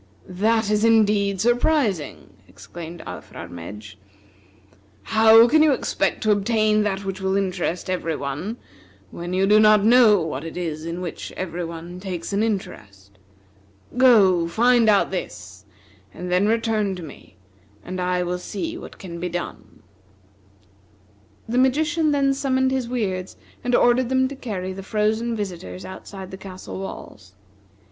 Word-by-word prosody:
"This 215 Hz, +4 st, +1 dB
is 210 Hz, 0 st, +1 dB
indeed 210 Hz, -3 st, +3 dB
surprising!" 240 Hz, -, 0 dB, 0.2 s
exclaimed 170 Hz, 0 st, -10 dB
Alfrarmedj. 100 Hz, +5 st, -9 dB, 1.1 s
"How 225 Hz, +1 st, +6 dB
can 310 Hz, +5 st, +4 dB
you 305 Hz, -2 st, +5 dB
expect -, -, -1 dB
to 215 Hz, -, +3 dB
obtain 215 Hz, +1 st, +2 dB
that 200 Hz, -1 st, -2 dB
which 190 Hz, 0 st, -4 dB
will 190 Hz, +1 st, 0 dB
interest 185 Hz, -2 st, -2 dB
every 175 Hz, -3 st, -2 dB
one, 150 Hz, -, -4 dB, 0.5 s
when 175 Hz, +1 st, -6 dB
you 190 Hz, +1 st, +2 dB
do 210 Hz, +2 st, +5 dB
not 215 Hz, -1 st, +5 dB
know 225 Hz, -3 st, +6 dB
what 155 Hz, -4 st, -4 dB
it 165 Hz, +1 st, -7 dB
is 160 Hz, -3 st, -4 dB
in 170 Hz, +2 st, -5 dB
which 175 Hz, -3 st, -6 dB
every 175 Hz, -1 st, -4 dB
one 170 Hz, +2 st, -7 dB
takes 185 Hz, -1 st, -5 dB
an 200 Hz, -, +1 dB
interest? 100 Hz, -, -5 dB, 0.8 s
Go, 200 Hz, -9 st, +5 dB
find 235 Hz, +5 st, +3 dB
out 205 Hz, -2 st, +3 dB
this, -, -, -7 dB, 0.5 s
and 180 Hz, 0 st, -6 dB
then 185 Hz, +3 st, +3 dB
return 220 Hz, -3 st, 0 dB
to 180 Hz, -, -8 dB
me, 145 Hz, -10 st, -13 dB, 0.5 s
and 185 Hz, 0 st, -4 dB
I 180 Hz, 0 st, 0 dB
will 180 Hz, 0 st, -3 dB
see 325 Hz, -, -5 dB
what -, -, -11 dB
can 170 Hz, -3 st, -8 dB
be 180 Hz, +1 st, -3 dB
done." 175 Hz, 0 st, -7 dB, 1.6 s
The 240 Hz, +2 st, 0 dB
magician 310 Hz, +5 st, +2 dB
then 280 Hz, -2 st, +2 dB
summoned 260 Hz, -1 st, 0 dB
his 260 Hz, -3 st, -2 dB
Weirds 190 Hz, -7 st, -3 dB, 0.3 s
and 245 Hz, 0 st, +1 dB
ordered 245 Hz, +1 st, +3 dB
them 260 Hz, 0 st, +2 dB
to 280 Hz, -, -7 dB
carry 190 Hz, -8 st, -5 dB
the 195 Hz, -, -7 dB
frozen 220 Hz, +3 st, -1 dB
visitors 175 Hz, -, -6 dB
outside 190 Hz, 0 st, -9 dB
the 190 Hz, -, -7 dB
castle 190 Hz, -1 st, -9 dB
walls. 95 Hz, -, -9 dB
200 Hz, 145 wpm, -22 LUFS, 180-230 Hz, 1.6 s, How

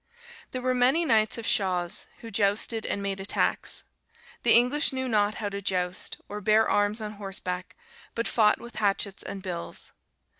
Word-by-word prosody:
"There 255 Hz, -1 st, -5 dB
were 255 Hz, 0 st, +2 dB
many 260 Hz, +7 st, +3 dB
knights 220 Hz, -6 st, +3 dB
of 230 Hz, -, -5 dB
Chauz, 180 Hz, -5 st, 0 dB
who 230 Hz, -, -8 dB
jousted 210 Hz, +2 st, +1 dB
and 200 Hz, -, -2 dB
made 195 Hz, -1 st, -2 dB
attacks. 195 Hz, -, 0 dB, 0.6 s
The -, -, +6 dB
English 250 Hz, +7 st, +4 dB
knew 260 Hz, -1 st, -2 dB
not 210 Hz, -2 st, +2 dB
how 210 Hz, -2 st, -3 dB
to 200 Hz, 0 st, -5 dB
joust, 180 Hz, -2 st, -2 dB
or 210 Hz, +1 st, -6 dB
bear 220 Hz, +1 st, +4 dB
arms 205 Hz, +2 st, +1 dB
on 210 Hz, -1 st, -4 dB
horseback 190 Hz, -3 st, -5 dB, 0.4 s
but 230 Hz, -, 0 dB
fought 215 Hz, -2 st, +3 dB
with 235 Hz, 0 st, -11 dB
hatchets 200 Hz, -2 st, 0 dB
and 195 Hz, -1 st, -7 dB
bills. 175 Hz, -3 st, -4 dB
210 Hz, 165 wpm, -27 LUFS, 195-230 Hz, 0.6 s, The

